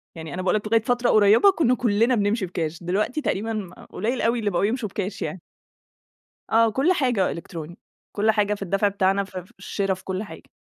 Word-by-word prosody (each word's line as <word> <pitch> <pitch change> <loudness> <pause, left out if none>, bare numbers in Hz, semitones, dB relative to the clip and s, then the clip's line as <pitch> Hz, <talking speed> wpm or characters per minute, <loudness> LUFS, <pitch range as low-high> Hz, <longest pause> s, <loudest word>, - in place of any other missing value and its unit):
يعني 160 -2 -7
أنا 185 - -3
باقول 185 +1 +1
لك 215 0 -2
لغاية 225 +1 +3
فترة 245 +2 +1
قريبة 215 - +6
كنا 295 -9 +2
كلنا 230 +1 +2
بنمشي 205 -1 0
بكاش، 170 -2 -4
دلوقتي 210 - -1
تقريبًا 215 -6 -2 0.2
قليل 235 +6 -2
أوي 235 +1 +1
اللي 210 -2 0
بقوا 175 -2 0
يمشوا 225 -1 -2
بكاش 195 +1 -4
يعني. 185 - -4 1.1
آه 230 0 +5
كل 270 +10 +2
حاجة 245 - +1
إلكتروني، 165 0 -8 0.3
كل 215 +2 +2
حاجة 210 -1 +1
في 205 - -7
الدفع 195 +2 +1
بتاعنا 195 0 +1
ف 190 -1 -10
في 180 0 -9
الشرا، 195 -1 -1
في 185 - -10
كل 190 +2 -3
حاجة. 205 - -12
205 Hz, 200 wpm, -24 LUFS, 190-230 Hz, 1.1 s, قريبة